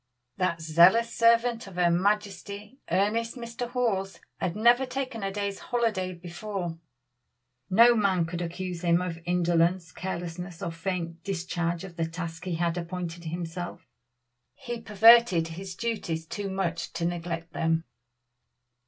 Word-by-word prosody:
That 180 -3 0
zealous 180 +9 +5
servant 230 -1 +3
of 190 - -11
her 175 -1 +3
majesty, 205 +4 -1
earnest 210 +7 +1
Mr. 235 0 -5
Hawes, 195 -7 -1 0.2
had 180 -1 -1
never 240 +4 +5
taken 255 -3 -4
a 195 0 -2
day's 200 0 -3
holiday 220 -7 -1
before. 175 0 -5 0.9
No 230 +5 +7
man 195 -6 +2
could 170 +1 -4
accuse 175 0 -4
him 170 -1 +3
of 180 -2 -4
indolence, 175 -1 +2
carelessness, 180 0 -5
or 170 - -2
faint 170 -1 -4
discharge 175 -2 -2
of 180 -3 -10
the 165 -1 0
task 165 0 -6
he 180 -2 -1
had 170 +1 0
appointed 170 -1 -5
himself. 170 +1 -5 0.7
He 240 -1 -6
perverted 220 -5 +6
his 185 +3 -7
duties 175 -8 -3
too 200 +4 -4
much 175 -3 -2
to 170 - -2
neglect 170 -1 -3
them. 165 0 +1
180 Hz, 135 wpm, -28 LUFS, 170-210 Hz, 0.9 s, No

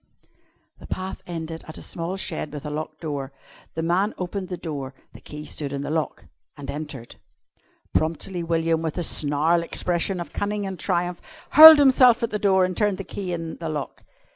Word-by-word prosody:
The - - -12
path 185 0 -5
ended 165 -1 -6
at 160 - -9
a - - -9
small 175 +3 -4
shed 160 -5 -3
with 145 -1 -8
a 150 - -4
locked 155 +1 -6
door. 145 -4 -4 0.4
The 160 - -2
man 185 +5 +1
opened 185 +1 -4
the 180 -1 -5
door 145 -6 -6 0.2
the - - -13
key 150 0 -9
stood 145 -3 -4
in 140 -1 -3
the 145 - -4
lock 160 -1 -2 0.3
and 145 - -6
entered. 145 -5 -8 0.8
Promptly 165 +3 -1
William, 165 -1 0
with 160 0 -3
a 175 - -1
snarl 155 +3 +1
expressive 175 +2 -1
of 170 -4 -7
cunning 205 0 -2
and 190 -2 -6
triumph, 175 -2 -1 0.3
hurled 315 +1 +12
himself 255 -4 +5
at 230 - -1
the 210 - -2
door 190 -2 +3
and 185 0 -4
turned 205 -1 +1
the 195 - -5
key 190 -1 -6
in 165 -1 -5
the 165 -2 -5
lock. 150 -3 -5
170 Hz, 190 wpm, -24 LUFS, 155-190 Hz, 0.8 s, hurled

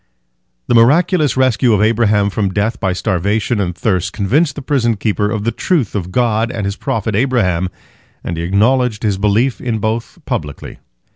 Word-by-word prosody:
The - - 0
miraculous 150 +6 +3
rescue 125 -2 +3
of 105 - +2
Abraham 105 -2 +2
from 100 -1 -1
death 105 +5 -1
by 95 -4 0
starvation 100 +5 -1
and 90 -3 -2
thirst 90 -1 -1
convinced 140 - +1
the 145 - -7
prison 120 -5 0
keeper 105 0 0
of 105 -1 -2
the 115 - 0
truth 155 - -1
of 90 -3 -4
God 115 0 +1
and 110 -5 -4
His 100 0 -2
prophet 110 0 -2
Abraham, 100 -8 +1 0.5
and 85 - -4
he 80 - -4
acknowledged 110 +5 +1
his 100 -3 0
belief 110 +5 +1
in 120 -3 -2
both 110 +2 -3
publicly. 75 -2 -5
110 Hz, 170 wpm, -16 LUFS, 100-120 Hz, 0.5 s, miraculous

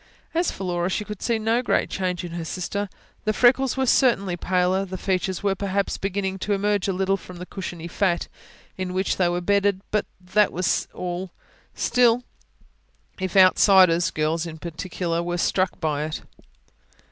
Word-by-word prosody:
As 340 +1 +1
for - - -6
Laura, 175 -1 -1
she 210 +2 -2
could 210 -2 -7
see 235 -2 +1
no 225 +2 +1
great 250 - +1
change 180 -2 -2
in 175 - -6
her 170 0 -4
sister; 195 +4 -3 0.3
the 215 - +1
freckles 255 +3 +3
were 265 - +2
certainly 230 -8 +3
paler, 180 +1 +1
and 195 -1 -4
the 185 - -4
features 190 0 -1
were 200 -1 +2
perhaps 200 0 -2
beginning 195 0 -2
to 205 - -1
emerge 205 0 +1
a - - +1
little, 190 +1 +1
from 180 -1 -11
the 180 - -7
cushiony 175 -3 -6
fat 175 -1 0 0.5
in 185 -1 -3
which 190 +1 0
they 180 -2 +3
were 175 0 -1
bedded; 200 +1 +2
but 210 - 0
that 190 +3 +2
was 180 0 0
all. 180 +1 -4 0.5
Still, 245 -1 +3 1.0
if 185 +1 -2
outsiders, 185 -2 +6
girls 155 +2 -1
in 160 -1 -8
particular, 170 +1 -3
were 175 0 -2
struck 185 +2 0
by 150 -3 -1
it 155 - -5
185 Hz, 175 wpm, -24 LUFS, 175-200 Hz, 1.0 s, outsiders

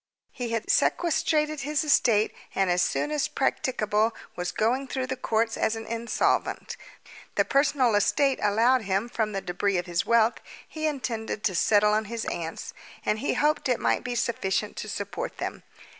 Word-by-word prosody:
He 245 -3 -5
had 230 -1 -2
sequestrated 310 -2 +1
his 295 +3 -1
estate, 230 -8 +3 0.2
and 195 -2 +2
as 175 0 +2
soon 295 - 0
as 300 -2 0
practicable 230 -6 0 0.2
was 180 0 -3
going 255 +5 0
through 260 0 -2
the 260 0 -3
courts 225 -2 0
as 220 - +1
an 225 0 -6
insolvent. 230 0 -1 0.6
The - - +3
personal 275 -4 +2
estate 270 +7 +2
allowed 230 +5 +3
him 200 +2 -1
from 220 -3 -1
the 195 -1 -3
debris 190 +2 -1
of 175 - -2
his 175 -1 -1
wealth 230 0 +3 0.3
he 315 0 -3
intended 230 -7 -3
to 195 - +1
settle 210 +3 +4
on 215 +1 +1
his 230 +2 -4
aunts, 165 -1 -5 0.3
and 210 - +1
he 280 - -1
hoped 300 -2 +1
it 250 - +2
might - - +1
be 245 -1 -3
sufficient 210 -4 -1
to 215 - -5
support 205 - -5
them. - - -4
230 Hz, 175 wpm, -26 LUFS, 210-265 Hz, 0.6 s, settle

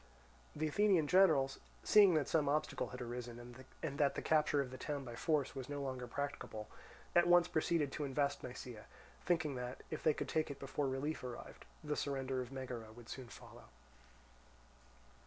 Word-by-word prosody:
The 155 +1 0
Athenian 190 0 +4
generals 155 -7 +4 0.2
seeing 200 -5 +7
that 150 -3 +2
some 150 -3 +2
obstacle 155 +1 0
had 125 0 -6
arisen, 120 0 -7 0.3
and 145 -3 -2
that 140 -2 +3
the - - -2
capture 150 -2 +3
of 135 -2 -1
the 130 - -7
town 145 -2 -3
by 120 -2 -7
force 150 +2 +1
was 135 0 -6
no 145 0 -3
longer 130 -3 -4
practicable, 120 -5 -4 0.5
at 175 0 +6
once 175 0 +6
proceeded 155 -3 +1
to 150 - -3
invest 140 +1 0
Nisaea, 125 -3 -8 0.4
thinking 165 -5 +1
that, 125 +1 -5
if 155 - -3
they 155 -2 +3
could - - -3
take 155 -1 0
it 140 - -5
before 140 +1 -2
relief 135 +4 -2
arrived, 125 -1 -8 0.2
the 150 -1 -1
surrender 135 -2 -1
of 125 0 -7
Megara 125 -4 -6
would 120 +1 -13
soon 130 -2 -6
follow. - - -12
140 Hz, 175 wpm, -37 LUFS, 125-155 Hz, 0.5 s, seeing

